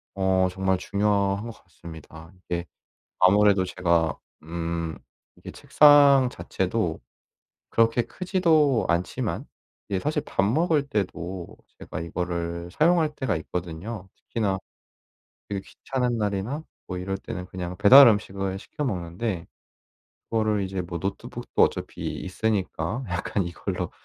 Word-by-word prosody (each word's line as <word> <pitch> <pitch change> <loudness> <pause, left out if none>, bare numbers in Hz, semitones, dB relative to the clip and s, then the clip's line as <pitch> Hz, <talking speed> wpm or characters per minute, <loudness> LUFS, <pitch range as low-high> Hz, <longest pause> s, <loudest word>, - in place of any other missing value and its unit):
어 95 -1 +2
정말 95 0 0
중요한 100 0 +1
것 115 - -9
같습니다. 80 -2 -12
이게 90 -1 -4 0.5
아무래도 100 0 +5
제가 85 -4 +1 0.3
음 85 0 -3 0.4
이게 - - -10
책상 145 -3 +6
자체도 95 -6 -2 0.7
그렇게 115 +1 +3
크지도 160 - +2
않지만 85 +1 -1 0.4
이게 95 -2 0
사실 150 +4 -1
밥 - - 0
먹을 145 - +2
때도 90 -5 -4 0.2
제가 75 - -6
이거를 85 0 -3
사용할 160 - +3
때가 130 - -1
있거든요. 90 +5 -6
특히나 100 -4 -2 0.9
되게 100 -1 -3
귀찮은 125 -3 -2
날이나 105 +8 -2 0.3
뭐 90 - -4
이럴 95 +1 -3
때는 90 -1 -6
그냥 90 -1 -6
배달음식을 100 -4 +6
시켜 150 - -6
먹는데 90 -2 -3 0.8
그거를 110 -2 +1
이제 95 0 -3
뭐 85 -1 -5
노트북도 95 +2 -3
어차피 - - 0 0.2
있으니까 100 +1 -2
약간 90 +2 -1
이걸로 85 - -4
95 Hz, 270 characters per minute, -25 LUFS, 90-115 Hz, 0.9 s, 책상